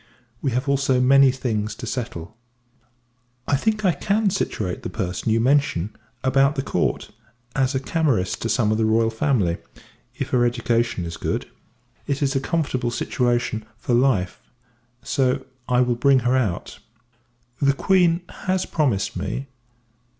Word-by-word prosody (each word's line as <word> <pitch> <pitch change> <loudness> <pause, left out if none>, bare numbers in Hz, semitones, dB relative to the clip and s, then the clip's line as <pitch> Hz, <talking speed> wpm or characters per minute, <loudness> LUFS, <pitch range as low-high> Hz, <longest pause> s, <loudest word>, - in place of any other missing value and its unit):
We 140 - 0
have 130 +3 -1
also 135 -2 +2
many 135 +2 +6
things 115 -5 -2
to 120 - -7
settle. 110 -6 -5 1.1
I - - +3
think, 215 +7 0
I 185 - +5
can 200 +6 +1
situate 95 - -2
the - - -5
person 95 +2 -2
you 115 - +3
mention 120 -7 +1 0.3
about 135 +2 +3
the 135 - -1
Court, - - -1 0.4
as 135 0 +1
a - - +2
Camerist 135 - 0
to 115 - -2
some 105 0 +2
of 110 - +1
the 110 - +2
R. 115 - +3
F 110 0 -4
y, 100 - +2 0.6
if - - -4
her 125 -1 +3
education 120 -5 0
is 85 0 -6
good. - - -2 0.6
It 140 0 -1
is 135 0 0
a - - +3
comfortable 135 -5 -1
situation 120 -2 -1
for 120 - -2
life; 120 -8 +2 0.6
so, 130 -2 0 0.2
I 125 0 +4
will 125 -1 +2
bring 130 +2 +4
her 125 +2 +2
out. 110 -9 -2 0.8
The 140 -1 +4
Q. 175 +2 +3 0.3
has 185 0 +1
promised 130 -11 0
me. 100 +9 -4
125 Hz, 155 wpm, -23 LUFS, 110-140 Hz, 1.1 s, many